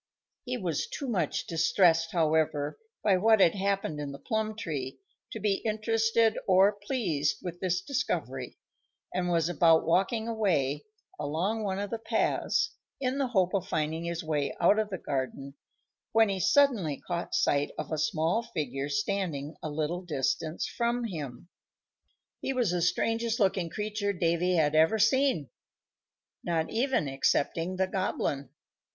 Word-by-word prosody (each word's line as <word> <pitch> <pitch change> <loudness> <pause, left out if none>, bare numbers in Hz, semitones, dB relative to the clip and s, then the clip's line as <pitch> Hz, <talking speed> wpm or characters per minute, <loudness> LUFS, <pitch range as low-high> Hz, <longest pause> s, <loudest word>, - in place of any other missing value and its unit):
He 250 0 -2
was 175 - -2
too 280 - -5
much 180 - -1
distressed, 165 0 +3
however, 155 - +1 0.2
by 200 -3 +4
what 220 +3 +4
had 170 -4 +5
happened 195 -6 -1
in 145 -1 -4
the 140 - -8
plum 215 +8 -2
tree 145 - -4 0.3
to - - -5
be 200 -2 0
interested 225 +1 +2
or 190 +1 +6
pleased 200 - -1
with 175 -1 -6
this 180 -1 0
discovery, 275 +6 -3 0.6
and 180 -1 -1
was 170 -2 +2
about 165 -2 +4
walking 195 +7 +1
away, 160 - 0 0.3
along 170 +10 -1
one 190 -2 -1
of 205 0 -4
the 230 - -2
paths, 225 - 0 0.3
in 265 +1 -1
the 275 - +1
hope 190 -7 +1
of 195 -3 -1
finding 160 +2 -1
his 170 0 -3
way 150 -3 -1
out 200 +5 +4
of 215 -1 -1
the 190 - -3
garden, 135 -1 -4 0.6
when 225 -1 +5
he 195 -1 -1
suddenly 210 - +3
caught 175 -1 -4
sight 145 0 +2
of - - -5
a 155 - -1
small 160 +7 +1
figure 145 - -4
standing 165 -4 -2
a 155 - -4
little 155 +4 -2
distance 155 0 -2
from 240 0 -1
him. 150 - -6 0.9
He 270 - -2
was 245 -8 +1
the 175 -1 0
strangest 225 +6 0
looking 190 -4 +1
creature 210 +2 -2
Davy 175 0 +1
had 155 -3 +2
ever 160 +7 +4
seen, 220 - +2 0.9
not 165 -2 -1
even 245 - +1
excepting 165 +6 0
the 190 0 +1
Goblin. 185 -7 -2
180 Hz, 150 wpm, -29 LUFS, 155-220 Hz, 0.9 s, or